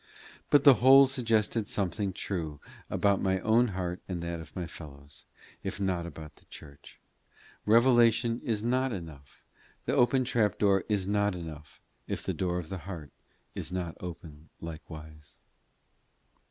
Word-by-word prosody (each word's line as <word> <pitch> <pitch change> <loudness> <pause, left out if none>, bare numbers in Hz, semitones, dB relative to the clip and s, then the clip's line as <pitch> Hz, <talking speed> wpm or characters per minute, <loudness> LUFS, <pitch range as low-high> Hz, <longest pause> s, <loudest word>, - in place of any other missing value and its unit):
But 145 -2 +5
the 140 - +9
whole 135 +2 +9
suggested 115 -4 +1
something 95 0 -1
true 85 -6 -4 0.3
about 100 -1 +2
my 95 -1 +1
own 115 +3 +4
heart 90 -3 -4
and 90 -2 -3
that 85 0 -4
of 80 -2 -12
my 90 - -3
fellows, 70 -4 -11 0.4
if - - -5
not 90 -3 -1
about 80 -2 -10
the - - -22
church: 70 -2 -13 0.7
Revelation 115 0 +4
is 110 -2 -1
not 130 +2 +1
enough, 80 - -9 0.4
the - - 0
open 130 +2 +3
trap 115 -4 +1
door 100 -2 +3
is 100 -3 0
not 105 -1 +1
enough, 80 -3 -9 0.3
if - - -4
the - - -2
door 90 -1 -1
of 85 -3 -5
the 95 - -5
heart 80 -6 -7 0.4
is - - -5
not 90 -3 -3
open 80 -3 -9
likewise. 80 -2 -10
95 Hz, 150 wpm, -29 LUFS, 80-110 Hz, 0.7 s, the